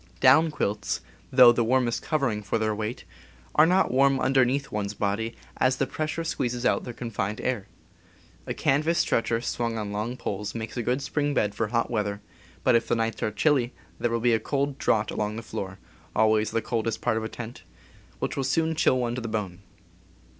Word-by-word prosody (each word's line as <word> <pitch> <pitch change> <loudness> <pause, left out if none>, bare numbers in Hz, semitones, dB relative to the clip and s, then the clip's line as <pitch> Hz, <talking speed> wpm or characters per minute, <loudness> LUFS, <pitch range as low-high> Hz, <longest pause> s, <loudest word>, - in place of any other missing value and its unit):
Down 140 +5 +6
quilts, 105 -8 -2 0.3
though 125 -2 +9
the 120 0 +1
warmest 120 0 +1
covering 135 -9 0
for 100 +2 -1
their 110 -1 0
weight, 110 +4 -4 0.5
are 155 +1 +6
not 185 +2 +3
warm 135 +1 +4
underneath 135 +1 +2
one's 105 0 -3
body, 110 +3 -1 0.2
as 130 0 +3
the 135 - +1
pressure 155 +4 -3
squeezes 125 -6 -2
out - - +2
their 125 - -5
confined 110 -3 -3
air. 125 -6 -2 0.8
A - - -3
canvas 155 +5 +2
stretcher 115 -4 +1
swung 115 -1 -2
on 105 -2 -3
long 110 +5 -3
poles 105 -1 -4
makes 115 -1 -5
a 120 - -1
good 125 +4 -1
spring 145 +1 -1
bed 105 -1 +1
for 115 - -1
hot 115 +3 0
weather; 105 -3 -1 0.4
but 130 - +4
if 115 0 +3
the - - +2
nights 115 0 -1
are - - +1
chilly 130 +1 +1 0.3
there 120 - +1
will 115 0 0
be 120 0 +3
a 110 - +3
cold 140 +1 -2
draught 105 -1 +1
along 105 0 -2
the 115 - -6
floor 95 -3 -5 0.4
(always 110 0 +3
the 115 0 -1
coldest 115 -2 -1
part - - +1
of 110 - -2
a 110 - -3
tent) 120 +1 -8 0.6
which - - -3
will 135 - -1
soon 160 +5 +1
chill 150 -4 +3
one 120 -1 -1
to 125 - -3
the 115 - -4
bone. 100 -5 -3
120 Hz, 200 wpm, -26 LUFS, 110-135 Hz, 0.8 s, though